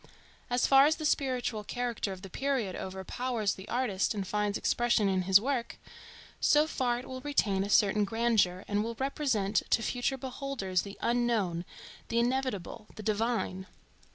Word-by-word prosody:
As 245 Hz, 0 st, +2 dB
far 275 Hz, +1 st, +7 dB
as 315 Hz, -, +2 dB
the 310 Hz, -, -5 dB
spiritual 250 Hz, -7 st, 0 dB
character 240 Hz, -2 st, -3 dB
of 190 Hz, 0 st, -8 dB
the 195 Hz, -, -8 dB
period 265 Hz, -8 st, -1 dB
overpowers 210 Hz, +4 st, -2 dB
the 190 Hz, +1 st, -11 dB
artist 225 Hz, -5 st, 0 dB
and 195 Hz, -2 st, -3 dB
finds 210 Hz, +1 st, 0 dB
expression 240 Hz, -3 st, +2 dB
in 190 Hz, -1 st, +1 dB
his 190 Hz, +1 st, +8 dB
work, 245 Hz, 0 st, -2 dB, 0.6 s
so 300 Hz, +1 st, +4 dB
far 250 Hz, -6 st, 0 dB
it 250 Hz, -, -8 dB
will 260 Hz, 0 st, -6 dB
retain 210 Hz, -10 st, +1 dB
a 200 Hz, -, -4 dB
certain 210 Hz, 0 st, +4 dB
grandeur, 205 Hz, -4 st, +1 dB
and 205 Hz, 0 st, 0 dB
will 230 Hz, +1 st, -4 dB
represent 240 Hz, -6 st, -1 dB
to 230 Hz, -, +2 dB
future 245 Hz, +4 st, -1 dB
beholders 255 Hz, -8 st, -2 dB
the 200 Hz, 0 st, -9 dB
Unknown, 230 Hz, -8 st, 0 dB, 0.4 s
the 230 Hz, -, -2 dB
Inevitable, 235 Hz, -4 st, -1 dB
the 215 Hz, -, -8 dB
Divine. 215 Hz, -3 st, -1 dB
230 Hz, 160 wpm, -30 LUFS, 200-255 Hz, 0.6 s, his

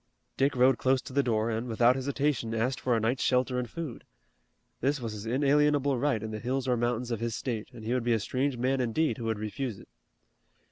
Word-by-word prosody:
Dick 140 Hz, +1 st, +2 dB
rode 130 Hz, 0 st, +4 dB
close 130 Hz, 0 st, +3 dB
to -, -, -9 dB
the 140 Hz, -, +4 dB
door, 115 Hz, -3 st, 0 dB
and, 115 Hz, +2 st, -2 dB
without 120 Hz, +1 st, +4 dB
hesitation, 135 Hz, -3 st, -1 dB
asked 125 Hz, +3 st, 0 dB
for 125 Hz, -2 st, +1 dB
a -, -, +1 dB
night's 115 Hz, +4 st, 0 dB
shelter 125 Hz, 0 st, +2 dB
and 125 Hz, -2 st, -4 dB
food. 155 Hz, -3 st, -6 dB, 0.8 s
This 140 Hz, +3 st, +1 dB
was 115 Hz, -3 st, -4 dB
his 105 Hz, +1 st, -7 dB
inalienable 145 Hz, +2 st, +3 dB
right 130 Hz, -5 st, +1 dB
in 110 Hz, -, -4 dB
the 110 Hz, -, -4 dB
hills 130 Hz, +3 st, -2 dB
or 125 Hz, -, +3 dB
mountains 120 Hz, +1 st, -1 dB
of 115 Hz, -, -1 dB
his 115 Hz, -1 st, -2 dB
state, 115 Hz, -3 st, -3 dB
and 110 Hz, -, -11 dB
he 115 Hz, -, 0 dB
would 125 Hz, -2 st, 0 dB
be 120 Hz, 0 st, +2 dB
a 110 Hz, -, +2 dB
strange 130 Hz, +4 st, -1 dB
man 130 Hz, +2 st, +1 dB
indeed 125 Hz, +5 st, 0 dB
who 115 Hz, -, -4 dB
would 110 Hz, -1 st, 0 dB
refuse 110 Hz, +2 st, -4 dB
it. -, -, -15 dB
125 Hz, 230 wpm, -29 LUFS, 115-135 Hz, 0.8 s, rode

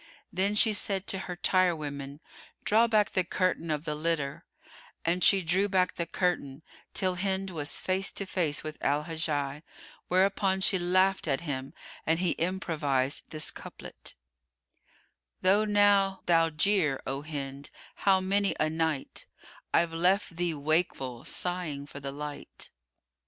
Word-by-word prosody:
Then 195 Hz, +3 st, +1 dB
she 215 Hz, +1 st, +4 dB
said 195 Hz, -1 st, 0 dB
to 190 Hz, -, 0 dB
her 180 Hz, -, -3 dB
tirewoman, 150 Hz, -6 st, 0 dB, 0.4 s
"Draw 225 Hz, +3 st, +4 dB
back 215 Hz, -3 st, +2 dB
the 185 Hz, -, +2 dB
curtain 180 Hz, -2 st, -1 dB
of 150 Hz, -1 st, -1 dB
the 150 Hz, -, -1 dB
litter;" 150 Hz, -3 st, -2 dB, 0.6 s
and 175 Hz, +1 st, +1 dB
she 195 Hz, +3 st, +5 dB
drew 190 Hz, +5 st, +2 dB
back 185 Hz, -2 st, +2 dB
the 170 Hz, -, -3 dB
curtain, 160 Hz, -6 st, -1 dB, 0.3 s
till 185 Hz, -1 st, +1 dB
Hind 190 Hz, 0 st, -1 dB
was 145 Hz, -3 st, -2 dB
face 190 Hz, +1 st, +1 dB
to 200 Hz, -, -3 dB
face 170 Hz, -6 st, 0 dB
with 155 Hz, 0 st, -6 dB
Al 145 Hz, +2 st, +2 dB
Hajjaj, 150 Hz, -3 st, -2 dB, 0.5 s
whereupon 190 Hz, +1 st, +2 dB
she 190 Hz, -1 st, +5 dB
laughed 185 Hz, +1 st, +2 dB
at 135 Hz, 0 st, +1 dB
him 135 Hz, -5 st, -5 dB, 0.3 s
and 160 Hz, +1 st, +2 dB
he 175 Hz, -1 st, +1 dB
improvised 150 Hz, -7 st, -1 dB
this 155 Hz, -1 st, -2 dB
couplet, -, -, -8 dB, 1.3 s
"Though 200 Hz, +3 st, +4 dB
now 205 Hz, -2 st, +4 dB
thou 165 Hz, -1 st, +4 dB
jeer, 155 Hz, -3 st, +2 dB
O 135 Hz, +1 st, -3 dB
Hind, 140 Hz, -2 st, -5 dB, 0.3 s
how 195 Hz, -1 st, +4 dB
many 195 Hz, +1 st, +1 dB
a 155 Hz, -, +2 dB
night 160 Hz, -3 st, -2 dB, 0.2 s
* -, -, -23 dB
I've 170 Hz, -1 st, +3 dB
left 180 Hz, +2 st, +2 dB
thee 170 Hz, -1 st, -1 dB
wakeful 140 Hz, -5 st, 0 dB
sighing 175 Hz, -6 st, -1 dB
for 145 Hz, -, -9 dB
the 140 Hz, -1 st, -5 dB
light." 145 Hz, +1 st, -6 dB
170 Hz, 145 wpm, -29 LUFS, 150-190 Hz, 1.3 s, she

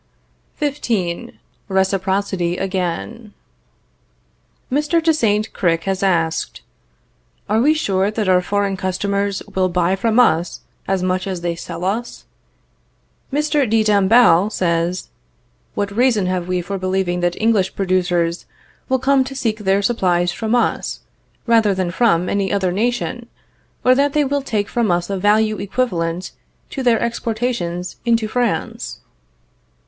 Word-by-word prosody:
XV. 225 Hz, -, -2 dB, 0.4 s
RECIPROCITY 190 Hz, -2 st, 0 dB
AGAIN. 195 Hz, +4 st, -3 dB, 1.4 s
Mr. 300 Hz, +5 st, +2 dB
de 325 Hz, -1 st, +4 dB
Saint 215 Hz, -7 st, 0 dB
Cricq 165 Hz, -2 st, +1 dB
has 190 Hz, 0 st, -2 dB
asked: 165 Hz, -4 st, 0 dB, 0.9 s
"Are 215 Hz, +2 st, +2 dB
we 300 Hz, +5 st, +4 dB
sure 195 Hz, -9 st, +1 dB
that 215 Hz, -1 st, -2 dB
our 180 Hz, -1 st, +4 dB
foreign 200 Hz, +1 st, -1 dB
customers 200 Hz, +1 st, -2 dB
will 185 Hz, -1 st, +1 dB
buy 180 Hz, +1 st, +1 dB
from 225 Hz, +4 st, +1 dB
us 170 Hz, -7 st, +2 dB, 0.3 s
as 190 Hz, -1 st, 0 dB
much 185 Hz, +1 st, -1 dB
as 185 Hz, -3 st, -4 dB
they 170 Hz, -1 st, -2 dB
sell 170 Hz, +1 st, -6 dB
us?" 225 Hz, +5 st, -3 dB, 1.1 s
Mr. 295 Hz, -2 st, +1 dB
de 225 Hz, 0 st, +3 dB
Dombasle 205 Hz, -2 st, +5 dB
says: 170 Hz, -1 st, -1 dB, 0.7 s
"What 200 Hz, 0 st, -2 dB
reason 235 Hz, -5 st, +3 dB
have 180 Hz, -1 st, -2 dB
we 180 Hz, -1 st, 0 dB
for 195 Hz, +2 st, -4 dB
believing 185 Hz, -1 st, -1 dB
that 175 Hz, 0 st, -1 dB
English 215 Hz, -4 st, +1 dB
producers 180 Hz, -3 st, 0 dB, 0.4 s
will 260 Hz, -, +3 dB
come 265 Hz, +1 st, +3 dB
to 270 Hz, +1 st, -7 dB
seek 225 Hz, -4 st, -1 dB
their 195 Hz, 0 st, +1 dB
supplies 180 Hz, -6 st, +1 dB
from 225 Hz, +1 st, -1 dB
us, 240 Hz, -, -1 dB, 0.4 s
rather 225 Hz, -4 st, +3 dB
than 185 Hz, -2 st, -1 dB
from 180 Hz, -4 st, +2 dB
any 200 Hz, 0 st, 0 dB
other 190 Hz, -3 st, +1 dB
nation, 240 Hz, +3 st, -2 dB, 0.6 s
or 255 Hz, -, +7 dB
that 280 Hz, +2 st, +2 dB
they 295 Hz, -1 st, +2 dB
will 285 Hz, +1 st, 0 dB
take 215 Hz, -6 st, -2 dB
from 235 Hz, -3 st, 0 dB
us 175 Hz, +2 st, 0 dB
a 195 Hz, -, -1 dB
value 215 Hz, +2 st, +2 dB
equivalent 180 Hz, -6 st, -2 dB, 0.4 s
to 270 Hz, -, -4 dB
their 240 Hz, -3 st, +3 dB
exportations 225 Hz, -6 st, -2 dB
into 230 Hz, -2 st, +1 dB
France?" 240 Hz, 0 st, -2 dB
200 Hz, 135 wpm, -19 LUFS, 180-230 Hz, 1.4 s, or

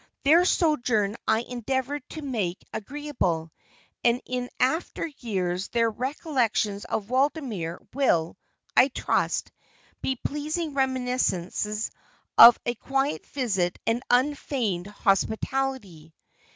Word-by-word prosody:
Their 330 Hz, +5 st, +6 dB
sojourn 240 Hz, -, +2 dB
I 220 Hz, +1 st, +3 dB
endeavored 260 Hz, +4 st, -3 dB
to 315 Hz, -, -7 dB
make 210 Hz, -10 st, -3 dB
agreeable, 210 Hz, -, -2 dB, 0.5 s
and 240 Hz, 0 st, +3 dB
in 250 Hz, -1 st, -3 dB
after 295 Hz, +8 st, 0 dB
years 190 Hz, -, -3 dB
their 230 Hz, -1 st, +1 dB
recollections 240 Hz, -, -1 dB
of 215 Hz, +2 st, -3 dB
Waldemere 255 Hz, -, 0 dB, 0.2 s
will, 175 Hz, -12 st, +2 dB, 0.4 s
I 255 Hz, -, +7 dB
trust, 270 Hz, -, -1 dB, 0.5 s
be 265 Hz, -, 0 dB
pleasing 300 Hz, +4 st, -3 dB
reminiscences 250 Hz, -6 st, -1 dB, 0.4 s
of 235 Hz, 0 st, +10 dB
a 240 Hz, -, 0 dB
quiet 270 Hz, +4 st, -2 dB
visit 195 Hz, -10 st, -1 dB
and 230 Hz, +2 st, +1 dB
unfeigned 245 Hz, -8 st, 0 dB
hospitality. 205 Hz, -, -1 dB
245 Hz, 100 wpm, -26 LUFS, 205-275 Hz, 0.5 s, of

